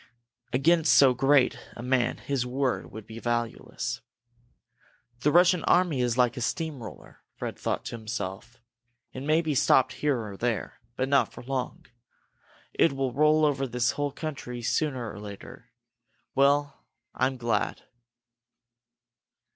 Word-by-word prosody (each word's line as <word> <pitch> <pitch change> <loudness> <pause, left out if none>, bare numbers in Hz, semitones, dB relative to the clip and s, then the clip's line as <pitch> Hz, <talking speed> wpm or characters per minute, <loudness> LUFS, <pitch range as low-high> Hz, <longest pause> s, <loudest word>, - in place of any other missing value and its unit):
Against 160 +5 +4
so 135 -2 +7
great 135 +1 +3 0.2
a 120 - -7
man 125 -1 +1
his 140 -3 -2
word 130 +1 -2
would 110 -1 -9
be 115 +1 -9
valueless. 120 -1 -3 1.2
"This 150 +4 +2
Russian 180 +1 +5
army 170 -8 +3
is 120 -1 0
like 125 -1 +3
a 125 - -5
steam 155 +2 -2
roller," 110 - -11
Fred - - -5
thought - - -3
to 120 - -5
himself. 110 +2 -6 0.5
"It 130 - -6
may 155 +4 +2
be 155 -2 -1
stopped 130 -1 +4
here 145 -3 0
or 105 -3 -7
there, 120 -1 -2 0.2
but 130 - -1
not 135 -4 +3
for - - -11
long. 130 0 -4 0.9
It 165 - +3
will 135 -2 -2
roll 155 +2 +4
over 135 -2 0
this 125 0 +1
whole 145 -1 -2
country 135 -5 -6
sooner 130 -3 -1
or - - -9
later. 100 -1 -10 0.6
Well 140 +1 +2 0.3
I'm 130 0 0
glad! 120 -1 -1
130 Hz, 140 wpm, -27 LUFS, 120-145 Hz, 1.2 s, so